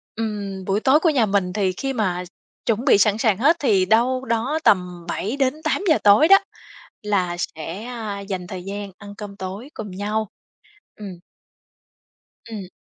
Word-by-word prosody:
Ừm, 200 Hz, -4 st, -4 dB
buổi 195 Hz, +1 st, +1 dB
tối 265 Hz, +6 st, +4 dB
của 330 Hz, -, +3 dB
nhà 260 Hz, -7 st, +3 dB
mình 195 Hz, -3 st, 0 dB
thì 195 Hz, -3 st, +1 dB
khi 270 Hz, 0 st, -2 dB
mà 185 Hz, -6 st, -1 dB, 0.4 s
chuẩn 230 Hz, +2 st, 0 dB
bị 270 Hz, -, +6 dB
sẵn 205 Hz, +1 st, +3 dB
sàng 220 Hz, -4 st, +2 dB
hết 295 Hz, +8 st, +4 dB
thì 205 Hz, -9 st, +3 dB
đâu 250 Hz, +6 st, +2 dB
đó 235 Hz, +7 st, 0 dB
tầm 180 Hz, -5 st, +2 dB
7:00-8:00 290 Hz, -, 0 dB
tối 205 Hz, +9 st, +6 dB
đó, 390 Hz, +2 st, +9 dB, 0.6 s
là 190 Hz, -4 st, 0 dB
sẽ, 165 Hz, +4 st, -5 dB
a, 225 Hz, -4 st, -5 dB
dành 190 Hz, -3 st, -5 dB
thời 185 Hz, -2 st, -7 dB
gian 200 Hz, +1 st, -6 dB
ăn 205 Hz, 0 st, -11 dB
cơm 205 Hz, -1 st, -8 dB
tối 195 Hz, +6 st, -7 dB
cùng 210 Hz, -3 st, -7 dB
nhau. 210 Hz, +3 st, -2 dB, 0.7 s
Ừm. 195 Hz, -4 st, -8 dB, 1.3 s
Ừm. 205 Hz, -5 st, -6 dB
210 Hz, 160 wpm, -22 LUFS, 195-245 Hz, 1.3 s, đó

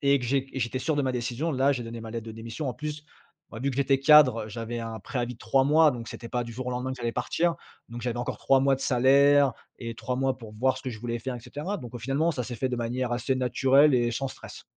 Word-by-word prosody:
et 140 Hz, 0 st, +4 dB
que 125 Hz, -, -5 dB
j'é 135 Hz, +2 st, 0 dB
j'étais 130 Hz, -1 st, -2 dB
sûr 155 Hz, +3 st, -1 dB
de 145 Hz, -, +1 dB
ma 130 Hz, -1 st, 0 dB
décision, 125 Hz, +6 st, -2 dB
là 135 Hz, +1 st, +3 dB
j'ai 125 Hz, -3 st, -3 dB
donné 115 Hz, 0 st, -7 dB
ma 110 Hz, 0 st, -8 dB
lettre 115 Hz, 0 st, -5 dB
de 110 Hz, -, -6 dB
démission. 115 Hz, +6 st, -5 dB
En 125 Hz, -, -3 dB
plus, 150 Hz, 0 st, -6 dB, 0.5 s
ouais 115 Hz, -, -8 dB
vu 140 Hz, +2 st, 0 dB
que 130 Hz, -, -6 dB
j'étais 135 Hz, -1 st, +2 dB
cadre, 135 Hz, -6 st, +6 dB
heu, -, -, -10 dB
j'avais 115 Hz, +2 st, -5 dB
un 115 Hz, -1 st, -5 dB
préavis 125 Hz, +2 st, -3 dB
de -, -, -20 dB
3 130 Hz, +4 st, +2 dB
mois, 155 Hz, +2 st, +5 dB
donc 120 Hz, -4 st, -6 dB
c'était 115 Hz, -, -8 dB
pas 125 Hz, -, -1 dB
du 115 Hz, -, -8 dB
jour 125 Hz, +2 st, -6 dB
au -, -, -1 dB
lendemain 125 Hz, +1 st, -3 dB
que 130 Hz, -, -6 dB
j'allais 120 Hz, -1 st, -3 dB
partir. 165 Hz, +7 st, 0 dB, 0.4 s
Donc 120 Hz, +1 st, -6 dB
j'avais 120 Hz, 0 st, -2 dB
encore 120 Hz, -, -3 dB
3 135 Hz, -1 st, +3 dB
mois 135 Hz, 0 st, +3 dB
de -, -, -14 dB
salaire 140 Hz, +2 st, +4 dB, 0.3 s
et 115 Hz, -2 st, -5 dB
3 125 Hz, 0 st, -3 dB
mois 135 Hz, 0 st, 0 dB
pour 110 Hz, -4 st, -11 dB
voir 130 Hz, +4 st, +1 dB
ce -, -, -13 dB
que 130 Hz, -, -4 dB
je 110 Hz, -, -8 dB
voulais 120 Hz, 0 st, -3 dB
faire 130 Hz, +2 st, -4 dB
et -, -, -9 dB
cetera. 155 Hz, -, -5 dB
Donc 120 Hz, -, -9 dB
au -, -, -4 dB
finalement 135 Hz, +7 st, 0 dB
ça 135 Hz, -6 st, -3 dB
s'est 125 Hz, -, -6 dB
fait 130 Hz, -, -1 dB
de 125 Hz, -, -1 dB
manière 120 Hz, +1 st, -2 dB
assez 125 Hz, +2 st, 0 dB
naturelle 135 Hz, +3 st, +4 dB
et 120 Hz, -1 st, +2 dB
sans 135 Hz, +4 st, -2 dB
stress. -, -, -11 dB
125 Hz, 290 wpm, -27 LUFS, 120-135 Hz, 0.5 s, cadre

